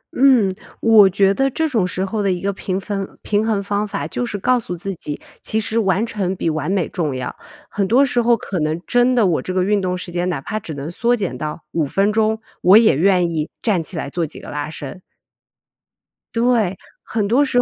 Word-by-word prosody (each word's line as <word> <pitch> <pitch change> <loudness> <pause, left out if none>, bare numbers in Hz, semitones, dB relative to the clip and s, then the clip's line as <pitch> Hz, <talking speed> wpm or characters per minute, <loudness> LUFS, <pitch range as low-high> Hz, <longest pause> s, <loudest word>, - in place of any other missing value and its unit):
嗯， 255 -6 +5 0.3
我 220 -4 +6
觉 195 +1 +3
得 270 +6 +1
这 320 +5 0
种 225 -11 +1
时 185 +1 -2
候 210 +2 -2
的 200 -1 +1
一 180 - -1
个 200 +2 -1
平 190 0 -3
分 195 -1 -3 0.2
平 210 0 +1
衡 210 -3 0
方 205 +1 -1
法， 145 - -4
就 165 +10 -3
是 235 -4 -3
告 250 +5 +2
诉 180 -6 -6
自 195 +3 -4
己 150 -4 -6 0.2
其 220 - 0
实 220 +1 -1
完 195 0 +1
成 195 -5 -2
比 165 - -1
完 155 +4 -2
美 190 -4 +1
重 155 -7 -2
要。 130 -1 -4 0.3
很 200 -2 -1
多 255 +6 +5
时 245 -2 +1
候 235 0 +3
可 190 -3 -4
能 155 +1 -1
真 245 +1 +3
的， 235 -4 +4
我 175 -4 +1
这 - - -5
个 185 - +2
运 205 +1 +1
动 180 -1 -1
时 180 -1 -8
间 175 +1 -1
哪 165 -6 -2
怕 215 +10 -4
只 160 -7 -7
能 140 +2 -5
缩 240 +7 +1
减 200 -6 -3
到 155 +1 -5
5 155 -4 0
分 200 +7 +1
钟， 220 0 +1 0.2
我 185 +4 +7
也 225 -9 +5
愿 180 +3 +3
意 155 -1 -2
站 200 -7 +2
起 165 +2 -7
来 160 - -3
做 170 +5 -2
几 155 - -5
个 - - -9
拉 145 +1 -3
伸。 155 +2 -8 1.3
对， 230 -5 +2 0.3
很 215 -3 -1
多 255 +7 +3
时 245 -2 +2
195 Hz, 245 characters per minute, -20 LUFS, 175-225 Hz, 1.3 s, 我